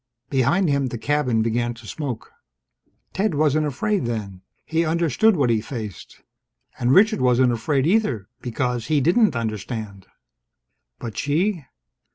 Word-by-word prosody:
Behind 140 +8 +2
him 140 -2 +1
the 120 - -5
cabin 125 -3 +1
began 120 +1 -1
to 115 -1 -14
smoke. 130 -1 -5 0.8
Ted 195 -4 0
wasn't 155 +1 +2
afraid, 200 - -1
then. 100 -5 -4 0.2
He 165 +1 0
understood 170 - +2
what 135 -7 +2
he 110 -2 +1
faced. 110 - -8 0.6
And 120 +1 +2
Richard 215 - +5
wasn't 125 0 +4
afraid, 135 +4 0
either, 160 - +1
because 125 -1 -2
he 155 -2 +2
didn't 180 - +3
understand. 110 -3 -5 0.9
But 115 -3 -6
she? 165 +3 0
130 Hz, 135 wpm, -22 LUFS, 115-160 Hz, 0.9 s, Richard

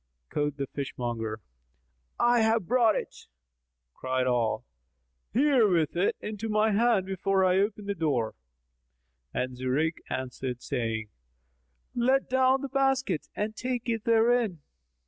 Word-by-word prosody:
Quoth 145 -1 -1
the 140 - -2
fishmonger, 120 -5 -4 0.8
"I 240 0 +4
have 220 -2 +2
brought 230 0 +3
it." - - -6 0.7
Cried 130 0 -1
Ali, 120 -3 +1 0.7
"Here 260 -2 +4
with 165 -6 +1
it 180 +3 +2
into 215 +1 -5
my 215 +1 +3
hand 215 -2 +3
before 190 0 +1
I 185 +1 +3
open 205 +1 -1
the 200 - -1
door;" 140 - 0 1.0
and 125 - -2
Zurayk 135 +6 -1
answered, 125 -1 -4
saying, 115 -4 -2 0.8
"Let 260 +3 +2
down 260 +1 +3
the 275 - -3
basket 270 - 0
and 215 +1 -2
take 250 +1 -3
it 225 -2 -1
therein." 230 -7 +2
195 Hz, 125 wpm, -28 LUFS, -, 1.0 s, I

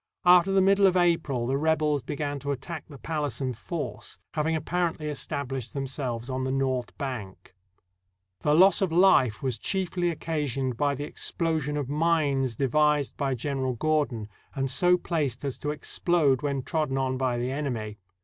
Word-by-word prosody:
After 180 +1 +6
the 195 -1 +4
middle 195 +1 +5
of 185 -1 +2
April 165 -8 +1
the 135 +3 0
rebels 155 -2 +1
began 145 +2 -3
to 140 +1 -3
attack 140 +5 -5
the 140 - -10
palace 150 -4 -3
in 130 -2 -1
force, 145 +7 -5 0.2
having 160 +1 0
apparently 165 0 -1
established 135 -4 -4
themselves 130 -4 -3
on 130 0 -2
the 130 - -1
north 130 -2 -1
bank. 115 -11 -6 0.9
The 150 0 +2
loss 190 +3 +6
of 190 -4 +1
life 160 - +4
was 130 -3 -1
chiefly 180 -2 -1
occasioned 145 -6 -2
by 145 +3 +1
the 145 - -5
explosion 155 -1 -2
of 145 -3 -2
mines 145 -5 +1
devised 150 +3 +2
by 135 -2 -1
General 130 0 -2
Gordon, 140 -5 0 0.3
and 135 -1 -1
so 180 +7 +4
placed 145 -7 -2
as 135 - -4
to 150 - -3
explode 150 -1 +1
when 140 -3 -1
trodden 150 -4 -1
on 130 -1 0
by 130 -2 0
the 125 +2 -2
enemy. 120 -7 -3
145 Hz, 165 wpm, -27 LUFS, 130-160 Hz, 0.9 s, After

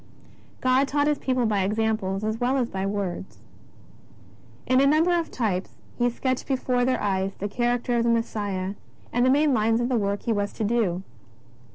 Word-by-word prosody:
God 260 +2 +3
taught 290 +1 +1
His 295 -1 +1
people 255 -2 0
by 210 -3 +1
examples 210 -1 -1
as 220 +1 -2
well 255 +2 +1
as 245 -3 -1
by 190 0 -2
words. 195 -2 -4 1.3
In 255 +1 +4
a 275 - +5
number 320 +5 +4
of 340 -1 0
types 195 -6 -2 0.2
He 245 0 +2
sketched 255 +1 -2
before 255 -2 0
their 255 +1 +1
eyes 195 -1 -1
the 205 - -3
character 240 +2 0
of 230 - +2
the 235 - +2
Messiah 205 -5 -1 0.4
and 245 - +2
the 255 - +4
main 290 +1 +4
lines 225 0 +2
of 240 +1 0
the 250 - +2
work 200 0 -1
He 230 - +1
was 205 -1 -2
to - - -4
do. 200 -5 0
230 Hz, 190 wpm, -25 LUFS, 200-255 Hz, 1.3 s, a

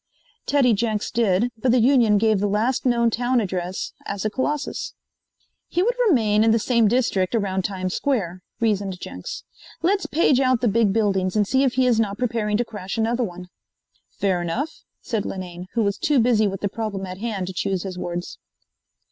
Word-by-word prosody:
Teddy 270 -5 +4
Jenks 215 0 -1
did, 230 +1 +2
but 250 +2 +2
the 250 - +4
union 235 -4 +4
gave 215 -1 +2
the 205 - +1
last 225 +6 0
known 235 -1 +3
town 245 +2 +1
address 185 -3 -3
as 200 -1 -3
the 215 - -1
Colossus. 290 +4 -3 0.7
"He 355 - 0
would 480 +4 +2
remain 215 - +3
in 225 - +4
the 225 - +4
same 230 0 +2
district 215 -4 +1
around 195 -3 0
Times 185 -1 -3
Square," 190 -10 -1 0.2
reasoned 200 -5 0
Jenks. - - -7 0.4
"Let's 390 +3 +1
page 290 -4 +3
out 255 -3 +2
the 245 - +2
big 220 -1 +3
buildings 195 -3 +1
and 210 -2 +2
see 265 +4 +2
if 260 -3 +2
he 260 0 +2
is 240 -3 +3
not 205 -2 0
preparing 225 -4 0
to 240 - 0
crash 205 -2 -6
another 230 +2 +1
one." 180 -3 -7 0.6
"Fair 190 -3 -1
enough," 225 - -3 0.2
said 220 -4 -2
Linane, 180 -1 -6
who 230 - +2
was 200 0 -1
too 295 -3 +2
busy 225 -3 +3
with 195 -1 -4
the 205 - +1
problem 200 -2 -4
at 185 0 -8
hand 210 -4 -3
to 185 - -6
choose 190 0 -1
his 190 -2 -5
words. 175 0 -5
215 Hz, 190 wpm, -23 LUFS, 195-245 Hz, 0.7 s, Teddy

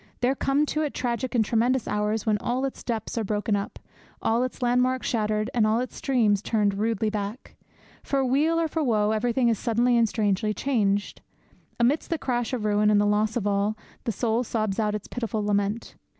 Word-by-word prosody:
There 250 +2 +3
come 275 +2 +1
to 305 +1 -1
it 300 -2 -2
tragic 245 +1 -2
and 225 -2 +3
tremendous 240 +3 +1
hours 210 +1 -1
when 215 -2 +2
all 255 +5 -1
its 270 - -5
depths 230 -1 -3
are - - -1
broken 210 +1 0
up, 200 0 -4 0.4
all 230 +2 +1
its 255 0 -4
landmarks 250 +1 +2
shattered, 215 -2 0
and 225 -3 +3
all 220 +2 +2
its 255 - -4
streams 220 -7 +2
turned 210 -2 +1
rudely 215 +1 0
back. 210 +4 -5 0.5
For 270 -1 0
weal 300 +6 +2
or 330 - +1
for 315 0 -2
woe 215 -5 +2
everything 235 +3 +1
is 230 -3 +1
suddenly 240 +2 +2
and 230 -2 +3
strangely 210 -1 0
changed. 205 -5 0 0.6
Amidst 255 +6 +2
the 330 - 0
crash 245 -5 -2
of 240 -5 -2
ruin 210 0 +3
and 210 -1 +4
the 205 - +3
loss 210 +2 +1
of 215 - -2
all, 205 +1 0 0.3
the 230 - 0
soul 225 +3 0
sobs 215 -3 -2
out 210 -1 +1
its 210 - -6
pitiful 225 -3 -3
lament. 205 +2 -1
225 Hz, 200 wpm, -26 LUFS, 210-250 Hz, 0.6 s, and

